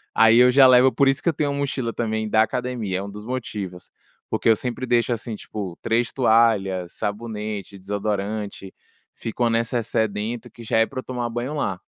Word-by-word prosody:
Aí 110 +1 +6
eu 125 0 +7
já 135 +1 +7
levo 130 +1 +6
por 140 - +2
isso 135 0 +2
que 170 - +3
eu - - 0
tenho 145 0 -1
uma 140 - -3
mochila 130 -4 -2
também 110 -2 -2
da 110 0 +4
academia, 115 -5 -3
é - - -4
um 100 - -6
dos 105 +1 -9
motivos. 105 -8 -5 0.4
Porque - - +1
eu 110 - +6
sempre 125 +2 -4
deixo 120 0 +2
assim, 115 -1 -5
tipo, 100 -5 -7
3 115 +1 +1
toalhas, 110 -7 +2
sabonete, 105 -2 -5
desodorante, 100 0 -4 0.4
fica 115 +2 -4
uma 120 - +3
necessaire 115 -2 0
dentro 110 +3 -4
que 115 - -12
já 110 - 0
é 115 - +5
pra 130 - -6
eu - - -6
tomar 120 -2 -3
banho 120 +5 -3
lá. 95 -10 -2
115 Hz, 200 wpm, -23 LUFS, 105-125 Hz, 0.4 s, eu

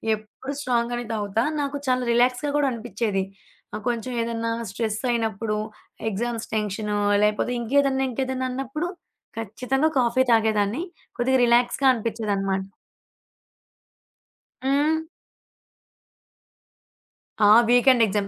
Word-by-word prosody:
ఎప్పుడు 215 +6 -8
స్ట్రాంగ్ 240 -3 0
గానే 240 0 -3
తాగుతా. 210 +1 0 0.2
నాకు 285 0 -2
చాలా 255 0 +2
రిలాక్స్‌గా 250 +4 +2
గూడా 285 -2 +2
అనిపిచ్చేది. 225 -4 -2 0.5
ఆహ్, 210 0 -5
కొంచెం 240 +1 -3
ఏదన్నా 230 0 -2 0.2
స్ట్రెస్ 215 +1 -2
అయినప్పుడు, 220 -2 -1 0.5
ఎగ్జామ్స్ 230 +2 -3
టెన్షను, 210 0 -1 0.3
లేపోతే 210 +4 0
ఇంకేదన్నా 270 +2 +2
ఇంకేదన్నా 260 +1 -2
అన్నప్పుడు 270 +6 -3 0.5
ఖచ్చితంగా 255 +7 0
కాఫీ 245 +1 +3
తాగేదాన్ని. 220 +4 +2 0.4
కొద్దిగా 260 +2 +3
రిలాక్స్‌గా 240 +3 +2
అనిపిచ్చేదనమాట. 205 -4 -1 2.0
హ్మ్. 295 +4 +2 2.5
ఆ! - - +6 0.2
Weekend 245 0 +5
exam. 205 -1 -1
235 Hz, 100 wpm, -24 LUFS, 215-260 Hz, 2.5 s, ఆ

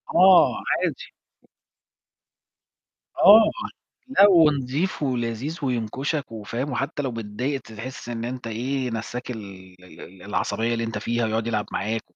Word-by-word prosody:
آه 185 0 +6
عادي. - - -2 2.1
آه، 220 +2 +8 0.6
لأ، 205 -7 +6
ونضيف 150 -1 +2
ولذيذ 125 +4 -2
وينكشك 130 +3 -2
وفاهم، 115 +6 -4
وحتى 140 +3 -2
لو 130 -3 -3
متضايق 115 +5 -3
تحس 115 +3 -9
إن 115 -1 -4
أنت 125 -1 -5
إيه 125 +3 -2
نسَّاك 120 +3 -5
ال 95 -5 -9
ال 85 -2 -15
ال 90 0 -13
العصبية 110 +3 -1
اللي 115 0 -2
أنت 115 -2 -4
فيها 120 +2 -1
ويقعد 110 +1 -1
يلعب 110 -3 -1
معاك 110 +3 -2
120 Hz, 130 wpm, -24 LUFS, 110-140 Hz, 2.1 s, آه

